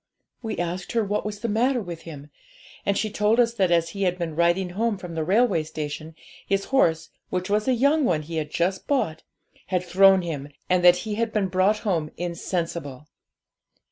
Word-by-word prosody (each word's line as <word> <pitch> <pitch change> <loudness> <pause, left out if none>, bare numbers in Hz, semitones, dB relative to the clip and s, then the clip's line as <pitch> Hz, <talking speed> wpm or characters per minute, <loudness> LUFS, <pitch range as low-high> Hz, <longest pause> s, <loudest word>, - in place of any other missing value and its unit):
We 220 -3 -4
asked 175 +2 -3
her 230 -1 +2
what 205 +1 -2
was 205 -1 -6
the 235 - -1
matter 245 +4 +1
with 175 -6 -7
him, 145 -1 -10 0.6
and 200 -1 +2
she 215 0 -1
told 210 +3 +2
us 230 -1 +3
that 195 -6 +1
as 170 -1 +2
he 200 +4 -7
had 180 -2 +1
been 165 -3 -4
riding 175 +2 +2
home 220 +3 0
from 180 -2 -8
the 160 -1 -2
railway 195 0 +3
station, 155 +1 -6 0.3
his 195 0 0
horse, 165 -11 +2 0.2
which 185 +2 -3
was 210 +3 +1
a 260 - +3
young 285 +5 +3
one 165 - +1
he 165 +2 -5
had 150 -1 -2
just 180 +4 -1
bought, 160 - 0 0.5
had 180 -1 0
thrown 190 +1 +5
him, 145 -4 -5 0.2
and 180 -1 +2
that 175 0 +8
he 215 - -3
had 230 -1 0
been 205 -3 0
brought 190 +3 +2
home 165 -7 0
insensible. 170 -5 -4
185 Hz, 200 wpm, -24 LUFS, 165-210 Hz, 0.6 s, that